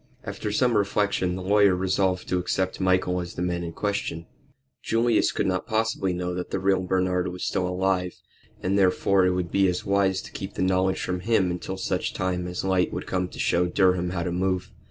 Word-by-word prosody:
After 105 - -4
some 120 +2 +2
reflection 100 -3 +1
the 95 - -5
lawyer 100 0 +4
resolved 95 0 0
to 90 - +1
accept 95 +1 -1
Michael 95 -1 +2
as 85 0 -8
the 90 - -2
man 90 -1 -1
in 85 - -4
question. 100 -3 -3 0.6
Julius 115 0 +2
could - - -1
not 95 +2 -1
possibly 110 -4 0
know 90 0 -3
that 90 0 -4
the - - -1
real 95 0 +2
Bernard 90 -1 0
was 90 0 -4
alive, 90 0 0 0.5
and 100 +2 +1
therefore 95 0 +3
it 90 - +2
would 90 -2 -2
be 100 -1 +3
as 90 -1 -2
wise 100 -1 +1
to - - -11
keep 95 +1 -7
the - - -1
knowledge 95 0 +1
from 90 0 -2
him 95 -2 +1
until 90 +2 -5
such - - -2
time 90 -1 -1
as 90 0 -4
light 95 -1 +1
would - - -4
come 90 -1 -1
to - - -12
show 90 +1 +2
Durham 90 -1 +2
how 90 -1 -2
to 90 - -2
move. 95 +1 -1
95 Hz, 205 wpm, -25 LUFS, 90-95 Hz, 0.6 s, lawyer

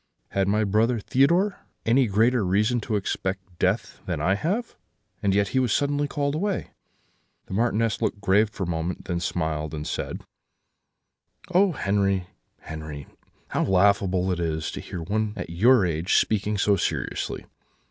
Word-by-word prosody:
'Had 95 -1 0
my 105 +2 +2
brother 110 +4 +2
Theodore 170 - +2 0.3
any 125 +2 +4
greater 110 +3 +3
reason 105 +6 +2
to 110 +1 -2
expect 95 -2 -3
death 95 +5 0
than - - -2
I 95 - +2
have? 195 - -2 0.5
And 100 - +2
yet 100 -1 +2
he 130 - +1
was 125 -3 +1
suddenly 145 +2 +1
called 140 0 -1
away.' 195 +5 -2 0.7
"The - - -8
Marchioness 115 -1 +1
looked 100 - -1
grave 100 +2 +3
for 105 -2 -5
a - - -3
moment; 85 +1 -3
then 85 -1 -2
smiled, 80 -3 -2
and 75 0 -5
said: - - -4 1.3
"'Oh 190 0 +4
Henri, 100 -5 +1 0.4
Henri, 75 -2 -7 0.4
how - - 0
laughable 95 -1 +3
it 90 - -1
is 80 -2 -2
to - - -6
hear 85 - -6
one 105 +3 -1
at 85 - -6
your 110 +5 +5
age 85 +1 0
speaking 105 0 +2
so 100 0 +3
seriously! 90 - -2
100 Hz, 155 wpm, -25 LUFS, 90-120 Hz, 1.3 s, your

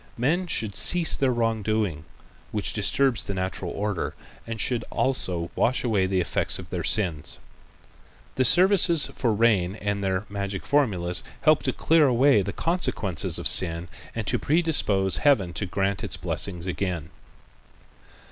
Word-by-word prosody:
Men 165 +10 0
should 110 - 0
cease 160 - +3
their 135 -2 +1
wrongdoing 110 -8 -1 0.5
which - - -1
disturbs 135 -5 +1
the 100 - -5
natural 95 -1 -4
order 100 0 -3 0.3
and 115 -1 -5
should 120 +1 +1
also 90 -10 -2
wash 130 - +1
away 105 -6 +1
the 95 0 0
effects 90 - +1
of 90 -2 -11
their 90 -2 -3
sins. 85 -5 +1 1.0
The 130 - +1
services 175 - +4
for 120 - 0
rain 105 -5 +2
with 100 -1 -3
their 95 +1 -2
magic 100 -1 -5
formulas 95 -12 +1 0.2
help 155 -1 +3
to - - -1
clear 160 -2 +3
away 130 -2 +3
the 100 +1 -4
consequences 165 - -1
of - - +2
sin 85 -1 +3 0.3
and 115 -2 -4
to - - 0
predispose 145 - +1
Heaven 105 -12 +2
to 100 - -3
grant 100 +2 -2
its - - -3
blessings 90 -3 -2
again. 90 -4 -4
105 Hz, 145 wpm, -24 LUFS, 95-130 Hz, 1.0 s, services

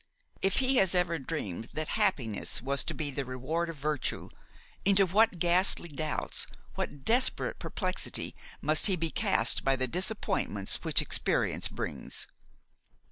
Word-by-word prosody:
If 195 0 +1
he 265 0 +2
has 190 -4 +4
ever 175 -2 +1
dreamed 115 - -5
that 155 0 -3
happiness 115 -6 0
was 135 +1 0
to - - -3
be 150 -3 -2
the 140 +1 -3
reward 135 +7 -3
of 165 - -5
virtue, 150 -1 -3 0.5
into 195 0 +5
what 205 +2 +3
ghastly 175 +1 +3
doubts, 155 +1 -3 0.3
what 140 -2 -5
desperate 250 +3 +3
perplexity - - -1 0.3
must 155 +5 +3
he 195 - +2
be 165 -2 -2
cast 115 - +2
by 135 0 +3
the 130 -1 -1
disappointments 190 - -1
which - - +2
experience - - +1
brings! - - -4
160 Hz, 140 wpm, -30 LUFS, 135-185 Hz, 0.5 s, into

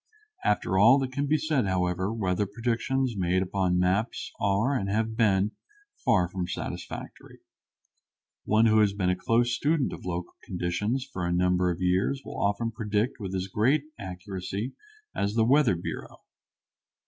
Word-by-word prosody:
After 95 -2 +1
all 115 +7 +7
that 135 -2 -2
can 140 +2 -1
be 155 +2 +3
said, 150 -9 0
however, 95 +1 0
weather 105 -2 0
predictions 120 +4 -1
based 95 -1 +1
upon 95 -1 0
maps 95 +5 0
are 100 +7 +2
and 100 -6 -1
have 110 +2 0
been 105 -2 +3 0.4
far 105 -9 +2
from 90 0 -4
satisfactory. - - -7 1.1
One 110 +2 +4
who 110 -1 +5
has 105 -2 +3
been 95 -3 +1
a - - +1
close 120 +5 +1
student 145 +3 +1
of - - -9
local 90 -1 -4
conditions 95 +8 -2
for 90 - -3
a - - -1
number 90 0 +2
of 90 +1 -3
years 95 +10 +1
will - - -6
often 105 +3 0
predict 110 +1 -1
with 95 -3 -4
as 95 0 -1
great 120 +10 +2 0.2
accuracy 95 +4 -5 0.4
as 100 +2 -1
the 115 -1 +4
weather 130 -5 +4
bureau. 85 - -6
100 Hz, 160 wpm, -27 LUFS, 90-115 Hz, 1.1 s, all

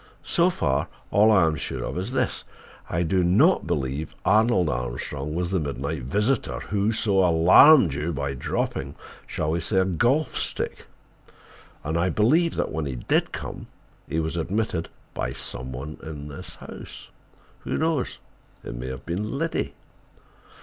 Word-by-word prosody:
So 175 0 +3
far, 70 - 0 0.2
all 105 +3 +5
I 95 -6 +5
am 80 -1 +1
sure - - -4
of - - -4
is 95 +7 -3
this: 130 -2 -1 0.5
I 85 - 0
do 90 +2 +2
not 105 - +4
believe 75 -2 -2
Arnold 110 -4 +4
Armstrong 70 +3 -3
was 90 +1 -1
the 95 - +2
midnight 70 0 -3
visitor 105 - 0
who 100 +1 0
so 105 -3 +1
alarmed 90 - +7
you 75 +5 -2
by 70 -2 -2
dropping—shall 70 +3 -4
we 85 - 0
say, 90 +4 -1
a 95 - +4
golf 120 - +1
stick? - - -3 1.0
And 80 +3 -1
I 90 +2 +2
believe 155 - +3
that - - -1
when 80 -1 -2
he 65 - -4
did - - +1
come - - -6 0.4
he 80 - 0
was 80 +1 -2
admitted 90 0 -1 0.2
by - - -3
some 65 +1 -6
one 70 +5 -7
in 75 -2 -7
the 70 - -8 0.2
house. - - -10 0.5
Who - - -3
knows—it 155 - -4
may - - -6
have 65 0 -7
been—Liddy!" 110 - -2
85 Hz, 150 wpm, -25 LUFS, 70-105 Hz, 1.0 s, alarmed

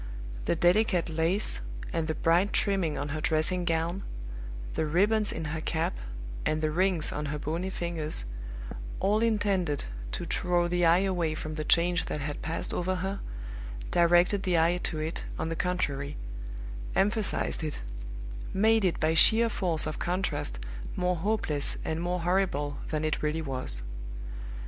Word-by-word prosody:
The - - +2
delicate 175 +1 +3
lace, 165 - +1 0.3
and 160 -1 0
the 155 - -1
bright 170 +6 +3
trimming 190 -7 +2
on 145 +1 -2
her 155 +2 -3
dressing 165 +3 +1
gown, 165 +3 0 0.7
the 155 - 0
ribbons 205 +7 +3
in 165 - -4
her 160 - -2
cap, 165 +3 0 0.5
and 155 - +1
the 155 0 +1
rings 180 -1 +2
on 150 0 -2
her 150 +1 -2
bony 165 +6 -2
fingers, 165 - -2 0.7
all 205 +2 +3
intended 200 - +1 0.3
to - - -3
draw 175 -1 +2
the 175 0 +2
eye 170 +3 +6
away 175 -5 0
from 155 0 -4
the 155 0 -3
change 175 +2 +3
that - - -3
had 145 0 -4
passed 160 +1 -3
over 185 +1 0
her, 195 +2 -2 0.7
directed 175 +3 +5
the 180 -3 +2
eye 170 +2 +3
to 160 - -2
it, 155 +2 -3
on 160 - -1
the 165 - -1
contrary; 145 -6 -1 0.8
emphasized 205 -4 +1
it; 155 -2 -2 0.8
made 220 +2 +4
it 180 -3 +2
by 155 +1 +3
sheer 225 +7 +7
force 175 -7 +2
of 155 0 -3
contrast 175 - -1 0.4
more 180 0 +1
hopeless 165 -6 0
and 160 +1 -1
more 175 0 -1
horrible 170 -5 +1
than 155 0 -1
it 155 - 0
really 150 +1 0
was. 130 - 0
170 Hz, 155 wpm, -29 LUFS, 155-185 Hz, 0.8 s, sheer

